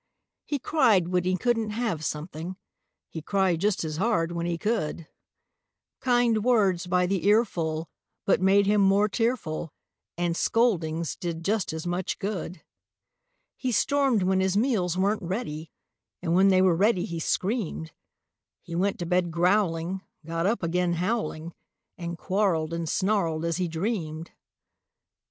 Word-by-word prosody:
He 290 Hz, -, 0 dB
cried 230 Hz, -, +3 dB
when 180 Hz, -1 st, +1 dB
he 185 Hz, 0 st, +1 dB
couldn't 230 Hz, 0 st, 0 dB
have 210 Hz, -8 st, -2 dB
something; 160 Hz, +4 st, -4 dB, 0.5 s
He 160 Hz, -, -7 dB
cried 185 Hz, -1 st, +1 dB
just 205 Hz, -3 st, +1 dB
as 155 Hz, -1 st, -4 dB
hard 180 Hz, -4 st, +1 dB
when 170 Hz, 0 st, -2 dB
he 170 Hz, -1 st, -1 dB
could; 170 Hz, -5 st, -2 dB, 0.9 s
Kind 240 Hz, -4 st, +2 dB
words 200 Hz, -8 st, +2 dB
by 180 Hz, 0 st, +2 dB
the 190 Hz, 0 st, -1 dB
earful 170 Hz, -7 st, +1 dB, 0.4 s
but 190 Hz, -, +3 dB
made 195 Hz, +1 st, +4 dB
him 205 Hz, +1 st, +3 dB
more 200 Hz, +2 st, +4 dB
tearful, 205 Hz, -9 st, -2 dB, 0.5 s
And 175 Hz, -1 st, 0 dB
scoldings 170 Hz, -9 st, +1 dB
did 170 Hz, -2 st, -5 dB
just 210 Hz, -1 st, 0 dB
as 160 Hz, +1 st, -5 dB
much 175 Hz, +1 st, -2 dB
good. 190 Hz, -3 st, -4 dB, 0.9 s
He 255 Hz, -, -2 dB
stormed 270 Hz, -4 st, +2 dB
when 190 Hz, +1 st, +2 dB
his 190 Hz, +1 st, +1 dB
meals 205 Hz, -8 st, +1 dB
weren't 200 Hz, +3 st, +1 dB
ready, 170 Hz, -4 st, -4 dB, 0.5 s
And 170 Hz, -2 st, -1 dB
when 190 Hz, +2 st, +5 dB
they 185 Hz, -1 st, +5 dB
were 180 Hz, -3 st, +4 dB
ready, 195 Hz, 0 st, +2 dB
he 170 Hz, -5 st, -5 dB
screamed. 180 Hz, -3 st, -2 dB, 0.7 s
He 170 Hz, -, -9 dB
went 190 Hz, +4 st, 0 dB
to 175 Hz, -, -4 dB
bed 180 Hz, 0 st, +1 dB
growling, 175 Hz, 0 st, +1 dB, 0.2 s
got 165 Hz, +2 st, -1 dB
up 220 Hz, -2 st, 0 dB
again 175 Hz, +1 st, +1 dB
howling 175 Hz, -3 st, -2 dB, 0.4 s
And 170 Hz, -1 st, -5 dB
quarreled 175 Hz, -5 st, 0 dB
and 165 Hz, -1 st, -3 dB
snarled 175 Hz, -5 st, 0 dB
as 170 Hz, 0 st, -1 dB
he 180 Hz, -1 st, 0 dB
dreamed. 165 Hz, -2 st, -3 dB
185 Hz, 145 wpm, -26 LUFS, 165-210 Hz, 0.9 s, when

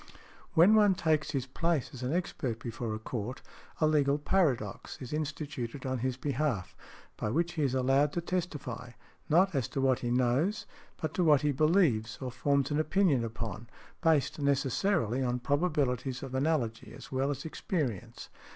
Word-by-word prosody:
When 175 Hz, +6 st, +7 dB
one 205 Hz, -3 st, +5 dB
takes 155 Hz, -3 st, +1 dB
his 135 Hz, -4 st, -1 dB
place 160 Hz, +2 st, -1 dB
as 130 Hz, -, -8 dB
an 125 Hz, +1 st, -2 dB
expert 150 Hz, -9 st, -2 dB
before 115 Hz, -1 st, -4 dB
a -, -, -3 dB
court, 115 Hz, +2 st, -5 dB, 0.4 s
a 155 Hz, -, +4 dB
legal 145 Hz, -2 st, +3 dB
paradox 145 Hz, -, 0 dB
is 130 Hz, +1 st, -7 dB
instituted 145 Hz, -4 st, -4 dB
on 130 Hz, -1 st, -1 dB
his 130 Hz, +1 st, -1 dB
behalf, 125 Hz, -9 st, -2 dB, 0.4 s
by 105 Hz, -, -2 dB
which 170 Hz, +8 st, 0 dB
he 160 Hz, -, -2 dB
is 135 Hz, -3 st, +1 dB
allowed 135 Hz, +3 st, +3 dB
to 175 Hz, -, -1 dB
testify—not 165 Hz, +1 st, -2 dB
as 135 Hz, -5 st, 0 dB
to -, -, -4 dB
what 130 Hz, -2 st, +3 dB
he 120 Hz, -, -2 dB
knows, 130 Hz, -, +1 dB, 0.3 s
but 155 Hz, -2 st, -3 dB
to 180 Hz, -, +1 dB
what 150 Hz, -4 st, +5 dB
he 150 Hz, -1 st, +2 dB
believes 140 Hz, -, +2 dB
or 130 Hz, -1 st, -4 dB
forms 140 Hz, +3 st, +1 dB
an 145 Hz, -, +1 dB
opinion 155 Hz, -5 st, +2 dB
upon, 115 Hz, -1 st, -5 dB, 0.3 s
based 160 Hz, -4 st, +2 dB
necessarily 140 Hz, -, +1 dB
on 125 Hz, -1 st, 0 dB
probabilities 135 Hz, -3 st, 0 dB
of 135 Hz, -1 st, -7 dB
analogy 130 Hz, -5 st, -1 dB
as -, -, -12 dB
well 135 Hz, +1 st, 0 dB
as 140 Hz, 0 st, -4 dB
experience. 150 Hz, -, -3 dB
140 Hz, 165 wpm, -30 LUFS, 125-155 Hz, 0.4 s, When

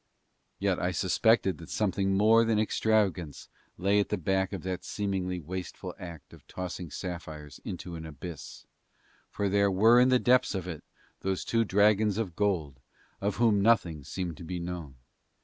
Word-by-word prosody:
Yet 95 Hz, -2 st, 0 dB
I 90 Hz, -, 0 dB
suspected 95 Hz, +1 st, +2 dB
that 80 Hz, -, -11 dB
something 95 Hz, -1 st, 0 dB
more 110 Hz, +3 st, +6 dB
than 115 Hz, -1 st, +1 dB
extravagance 105 Hz, -8 st, 0 dB, 0.3 s
lay 100 Hz, +3 st, +2 dB
at 100 Hz, -, 0 dB
the 105 Hz, -, 0 dB
back 95 Hz, +1 st, 0 dB
of 95 Hz, -5 st, -5 dB
that 95 Hz, -1 st, -3 dB
seemingly 95 Hz, -3 st, -2 dB
wasteful 90 Hz, +3 st, -6 dB
act 85 Hz, -3 st, -10 dB
of -, -, -16 dB
tossing 90 Hz, -2 st, -6 dB
sapphires 80 Hz, -4 st, -7 dB
into 90 Hz, -1 st, -6 dB
an 80 Hz, -1 st, -6 dB
abyss, 80 Hz, +1 st, -9 dB, 0.6 s
for 100 Hz, -, -2 dB
there 100 Hz, +1 st, +3 dB
were 110 Hz, +6 st, +5 dB
in 125 Hz, +1 st, +5 dB
the 130 Hz, -, +5 dB
depths 125 Hz, -4 st, +3 dB
of 95 Hz, -2 st, -3 dB
it 80 Hz, -4 st, -6 dB, 0.4 s
those 95 Hz, -1 st, -2 dB
two 115 Hz, 0 st, +2 dB
dragons 105 Hz, 0 st, +3 dB
of 100 Hz, -7 st, -3 dB
gold 85 Hz, -10 st, -1 dB, 0.4 s
of 100 Hz, 0 st, 0 dB
whom 110 Hz, -3 st, +3 dB
nothing 95 Hz, -9 st, +2 dB
seemed 85 Hz, +1 st, -4 dB
to -, -, -9 dB
be 90 Hz, +2 st, -4 dB
known. 85 Hz, -6 st, -6 dB
95 Hz, 165 wpm, -29 LUFS, 85-105 Hz, 0.6 s, more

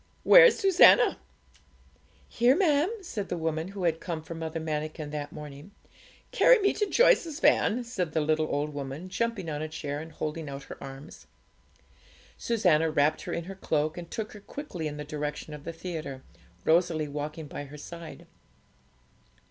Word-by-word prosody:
Where's -, -, +8 dB
Susannah?' 390 Hz, +3 st, +6 dB, 1.1 s
'Here, 245 Hz, +3 st, +3 dB
ma'am,' 310 Hz, -2 st, +3 dB
said 205 Hz, -, -5 dB
the 175 Hz, -, -2 dB
woman 160 Hz, 0 st, -2 dB
who 195 Hz, -1 st, -6 dB
had 165 Hz, -2 st, +1 dB
come 165 Hz, -3 st, -5 dB
for 165 Hz, -, -7 dB
Mother 165 Hz, 0 st, -4 dB
Manikin 155 Hz, -1 st, -4 dB
that 145 Hz, -1 st, -5 dB
morning. 150 Hz, +5 st, -10 dB, 0.6 s
'Carry -, -, +6 dB
me 400 Hz, -2 st, +2 dB
to 420 Hz, -, -1 dB
Joyce's 365 Hz, -, +3 dB
van,' 245 Hz, +3 st, +3 dB
said 185 Hz, -10 st, -3 dB
the 160 Hz, -, +2 dB
little 155 Hz, +1 st, +1 dB
old 145 Hz, +1 st, -2 dB
woman, 145 Hz, +5 st, -6 dB
jumping 220 Hz, -2 st, -2 dB
on 150 Hz, -1 st, -3 dB
a 155 Hz, -, -3 dB
chair 145 Hz, -2 st, -4 dB
and 160 Hz, +1 st, -9 dB
holding 155 Hz, 0 st, -5 dB
out 140 Hz, 0 st, -7 dB
her -, -, -10 dB
arms. 135 Hz, +1 st, -11 dB, 1.1 s
Susannah 175 Hz, -9 st, +2 dB
wrapped 155 Hz, 0 st, +2 dB
her -, -, -4 dB
in 170 Hz, -, -2 dB
her 190 Hz, +3 st, -8 dB
cloak, 155 Hz, -4 st, -1 dB
and 175 Hz, -1 st, -8 dB
took 220 Hz, -1 st, -5 dB
her 210 Hz, -, -11 dB
quickly 195 Hz, -, -6 dB
in 150 Hz, -1 st, -6 dB
the 150 Hz, -, -5 dB
direction 150 Hz, 0 st, -5 dB
of 150 Hz, -1 st, -10 dB
the 165 Hz, -, -4 dB
theatre, 160 Hz, -6 st, -6 dB, 0.4 s
Rosalie 160 Hz, -2 st, +2 dB
walking 150 Hz, +2 st, -5 dB
by 145 Hz, 0 st, -7 dB
her 145 Hz, +2 st, -11 dB
side. 170 Hz, +2 st, -10 dB
160 Hz, 170 wpm, -28 LUFS, 150-195 Hz, 1.1 s, Where's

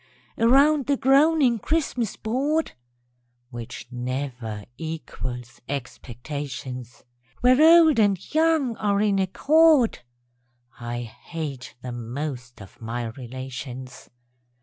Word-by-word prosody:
_) -, -, -1 dB
Around 280 Hz, +4 st, +5 dB
the 285 Hz, -1 st, +2 dB
groaning 275 Hz, -2 st, +4 dB
Christmas 265 Hz, -7 st, -1 dB
board, 280 Hz, +8 st, -1 dB, 0.8 s
(Which 115 Hz, -2 st, -7 dB
never 125 Hz, -4 st, -4 dB
equals 130 Hz, -6 st, -6 dB
expectations,) 130 Hz, -1 st, -6 dB, 0.4 s
Where 255 Hz, +3 st, +5 dB
old 320 Hz, -4 st, +7 dB
and 205 Hz, -3 st, +4 dB, 0.2 s
young 315 Hz, -6 st, +2 dB
are 200 Hz, -1 st, +1 dB
in 205 Hz, -2 st, +2 dB
accord 290 Hz, -, +4 dB, 0.8 s
(_I 120 Hz, 0 st, -4 dB
hate 135 Hz, +2 st, -7 dB
the 125 Hz, -, -5 dB
most 125 Hz, -1 st, -6 dB
of 95 Hz, -, -17 dB
my 115 Hz, +1 st, -4 dB
relations! 130 Hz, +1 st, -8 dB
155 Hz, 100 wpm, -24 LUFS, -, 0.8 s, old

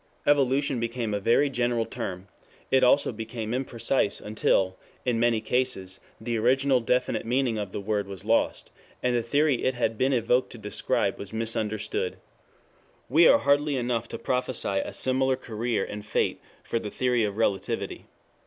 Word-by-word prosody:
'Evolution' 140 Hz, -2 st, +2 dB
became 115 Hz, -1 st, -2 dB
a 105 Hz, -, 0 dB
very 120 Hz, +8 st, +3 dB
general 120 Hz, -3 st, 0 dB
term; 90 Hz, -2 st, -6 dB, 0.4 s
it 130 Hz, -1 st, +4 dB
also 135 Hz, +3 st, +4 dB
became 115 Hz, 0 st, -5 dB
imprecise 125 Hz, -3 st, 0 dB
until, 95 Hz, -3 st, +1 dB, 0.3 s
in 120 Hz, -3 st, +1 dB
many 120 Hz, -1 st, +3 dB
cases, 110 Hz, -7 st, -1 dB, 0.2 s
the 115 Hz, +1 st, -2 dB
original, 130 Hz, +3 st, +3 dB
definite 125 Hz, +2 st, 0 dB
meaning 120 Hz, -1 st, 0 dB
of 100 Hz, -3 st, -4 dB
the -, -, -4 dB
word 100 Hz, 0 st, -1 dB
was 95 Hz, -3 st, -8 dB
lost, -, -, +1 dB, 0.3 s
and 125 Hz, -1 st, +2 dB
the 120 Hz, -, +2 dB
theory 140 Hz, +2 st, +1 dB
it 130 Hz, -, +1 dB
had 115 Hz, -2 st, -1 dB
been 130 Hz, +1 st, +3 dB
evoked 125 Hz, 0 st, +2 dB
to -, -, -9 dB
describe 105 Hz, -2 st, -1 dB
was 100 Hz, -, -6 dB
misunderstood. 110 Hz, -2 st, -2 dB, 0.9 s
We 160 Hz, +6 st, +6 dB
are -, -, +7 dB
hardy 145 Hz, 0 st, +2 dB
enough 120 Hz, -2 st, -1 dB
to -, -, -6 dB
prophesy 125 Hz, -6 st, -1 dB
a -, -, -6 dB
similar 130 Hz, 0 st, +1 dB
career 115 Hz, -3 st, -2 dB
and 105 Hz, 0 st, -7 dB
fate 110 Hz, -, -1 dB, 0.2 s
for 115 Hz, -, -2 dB
the 105 Hz, -, -5 dB
theory 125 Hz, 0 st, +1 dB
of 105 Hz, -1 st, -2 dB
Relativity. 100 Hz, -3 st, -1 dB
120 Hz, 160 wpm, -26 LUFS, 110-130 Hz, 0.9 s, are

